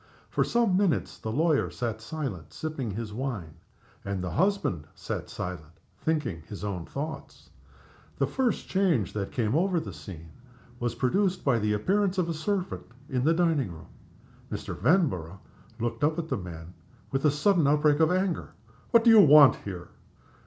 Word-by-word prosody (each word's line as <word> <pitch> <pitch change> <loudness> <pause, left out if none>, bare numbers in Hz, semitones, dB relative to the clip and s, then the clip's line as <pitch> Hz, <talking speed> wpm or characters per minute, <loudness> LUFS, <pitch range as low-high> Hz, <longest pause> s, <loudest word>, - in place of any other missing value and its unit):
For - - +2
some 235 -6 +2
minutes 190 -4 +1
the 110 - -4
lawyer 155 +4 +2
sat 115 -3 -4
silent, 110 - -5
sipping 155 -7 -4
his 105 +1 -5
wine, 110 - -4 0.5
and 100 -2 -3
the 90 - -3
husband 175 - 0
sat - - -5
silent, 80 -3 -7 0.2
thinking 145 - -1
his 100 -1 -8
own 95 -5 -4
thoughts. 155 +3 -7 0.7
The - - +2
first 255 -5 -1
change 175 - +1
that 100 -2 -3
came 110 -2 0
over 180 +1 +2
the 100 - -7
scene 80 +2 -10 0.5
was 120 -1 -2
produced 180 - 0
by 125 -5 +3
the 105 0 +1
appearance 195 - +1
of 180 -2 +1
a - - 0
servant 185 +4 -3 0.2
in 125 -1 0
the 160 +4 +4
dining 160 - +1
room. 80 - -12 0.6
Mr. - - -4
Vanborough 95 - +1 0.4
looked 115 +1 -2
up 155 +2 +2
at 165 -1 -3
the - - 0
man 85 -2 -8 0.4
with 135 0 -1
a 150 - +5
sudden 155 +2 +3
outbreak 150 0 +3
of 160 +1 +4
anger. 185 - -1 0.4
"What 230 -1 +5
do 230 - +7
you 220 -2 +9
want 150 -4 +8
here?" 90 -4 -8
135 Hz, 165 wpm, -28 LUFS, -, 0.7 s, you